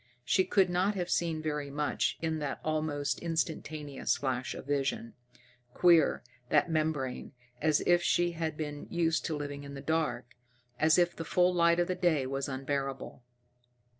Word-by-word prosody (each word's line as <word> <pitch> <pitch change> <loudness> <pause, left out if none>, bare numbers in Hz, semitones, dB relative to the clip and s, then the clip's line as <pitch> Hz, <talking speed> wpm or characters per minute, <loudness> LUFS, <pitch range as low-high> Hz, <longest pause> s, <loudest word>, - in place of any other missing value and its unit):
She 190 - +3
could 190 -3 +3
not 185 +4 +1
have 180 -2 -3
seen 160 -2 0
very 150 -2 -2
much 145 +1 -1
in 160 -1 -1
that 145 -2 -3
almost 155 -2 -1
instantaneous 155 -3 -2
flash 130 -2 -2
of - - -8
vision. 135 -4 -1 0.6
Queer, 170 -4 +4 0.3
that 155 +3 +3
membrane 155 -5 -1 0.3
as 155 -1 +3
if 175 0 +3
she 175 0 +2
had 160 -2 -3
been 150 -2 -5
used 165 -1 0
to 155 - -2
living 145 -1 -5
in 140 0 -8
the - - -6
dark, 135 -5 -2 0.5
as 160 +2 +4
if 175 -1 +2
the 165 - -5
full 180 +3 +2
light 170 -1 +4
of 175 - +2
the 185 - 0
day 175 -7 +1
was 135 +1 -3
unbearable! 135 0 -4
155 Hz, 165 wpm, -30 LUFS, 140-170 Hz, 0.6 s, Queer